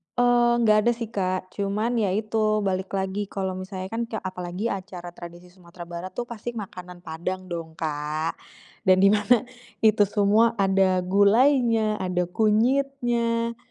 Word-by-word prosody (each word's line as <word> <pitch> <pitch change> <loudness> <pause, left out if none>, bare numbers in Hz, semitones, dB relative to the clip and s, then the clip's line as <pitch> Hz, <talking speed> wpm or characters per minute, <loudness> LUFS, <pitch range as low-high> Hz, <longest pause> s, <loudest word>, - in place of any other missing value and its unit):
Eee, 245 -1 +4
nggak 215 -1 +5
ada 240 - +5
sih 230 -2 -5
Kak, 185 -3 -2
cuman 210 +4 -1
ya 210 - +1
itu 215 0 0
balik 190 -1 -1
lagi 195 +1 -2
kalau 190 -1 -3
misalnya 185 0 -6
kan 230 +1 -2
ka 225 - -6
apalagi 185 +3 -4
acara 180 -2 -7
tradisi 175 +1 -12
Sumatera 175 -1 -12
Barat 175 +2 -8
tuh 245 - -2
pasti 235 0 -7
makanan 180 -4 -8
Padang 185 +3 -5
dong 165 -1 -6
Kak, 155 0 -3 0.5
dan 185 +1 +5
di 200 - +7
mana 215 +4 +3 0.4
itu 215 -2 +5
semua 215 +3 +3
ada 190 -2 +2
gulainya, 220 +3 +3
ada 180 -1 0
kunyitnya 235 0 +1
200 Hz, 150 wpm, -25 LUFS, 185-225 Hz, 0.5 s, di